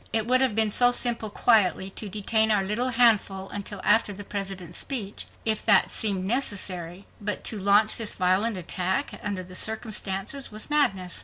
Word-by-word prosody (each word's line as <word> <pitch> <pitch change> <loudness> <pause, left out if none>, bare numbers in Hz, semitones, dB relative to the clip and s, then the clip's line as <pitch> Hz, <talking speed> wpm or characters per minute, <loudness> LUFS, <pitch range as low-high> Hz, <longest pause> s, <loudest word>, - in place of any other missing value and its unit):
It 220 -1 -1
would 255 +2 +3
have 260 -5 +1
been 220 -1 +3
so 245 +3 +5
simple 235 -3 +1
quietly 195 -4 +1
to 210 +1 -4
detain 220 +2 +2
our 205 -3 +2
little 220 +6 -1
handful 215 -5 +2
until 200 -1 -7
after 220 -2 +3
the 205 +1 -8
President's 195 -4 -6
speech, 215 -7 -4 0.2
if 220 -1 +1
that 205 -3 +4
seemed 195 -4 +1
necessary. 190 -6 -1 0.2
But 210 0 -3
to 215 - -2
launch 205 +2 +3
this 225 -2 -1
violent 190 +4 0
attack 185 +1 -2
under 200 -3 -5
the 185 0 -14
circumstances 220 +4 -2
was 215 +7 -6
madness. 195 - +1
205 Hz, 170 wpm, -25 LUFS, 190-225 Hz, 0.2 s, so